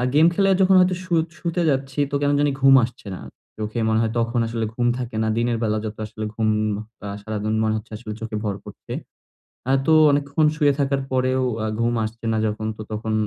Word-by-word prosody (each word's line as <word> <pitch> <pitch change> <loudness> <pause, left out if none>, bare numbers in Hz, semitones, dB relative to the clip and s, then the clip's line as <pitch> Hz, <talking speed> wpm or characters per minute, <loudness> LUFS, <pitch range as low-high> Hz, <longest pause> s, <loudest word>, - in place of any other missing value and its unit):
Game 155 - +6
খেলে 195 +2 +2
যখন 190 0 +5
হয়তো 180 0 +3
শু 180 - -4 0.3
শুতে 170 +1 -1
যাচ্ছি 135 +1 -2
তো 145 - -1
কেন 145 0 +2
জানি 145 0 +2
ঘুম 135 0 +7
আসছে 120 -3 -13
না। - - -9 0.4
চোখে 110 +2 -3
মনে 110 0 +2
হয় 110 -1 0
তখন 115 +1 0
আসলে 115 -1 -2
ঘুম 120 0 +1
থাকে 120 -3 -5
না। 110 - 0
দিনের 120 0 +1
বেলা 110 -1 +1
যত 110 0 -5
আসলে 110 0 -6
ঘুম 110 -1 +1 0.7
সারাদিন 110 0 -2
মনে 110 0 +1
হচ্ছে 110 - -10
আসলে 110 -1 -8
চোখে 115 -1 -4
ভর 100 -2 -1
করছে। - - -9 0.8
আ - - +4
তো 160 - +4 0.2
অনেকক্ষণ 145 +2 +2
শুয়ে 145 -2 +4
থাকার 140 0 +1
পরেও 130 0 +1 0.4
ঘুম 120 +1 +1
আসছে 115 +2 -7
না 110 - +1
যখন 110 +1 -3
তো - - -5
তখন 110 +1 -3
120 Hz, 205 wpm, -22 LUFS, 110-140 Hz, 0.8 s, ঘুম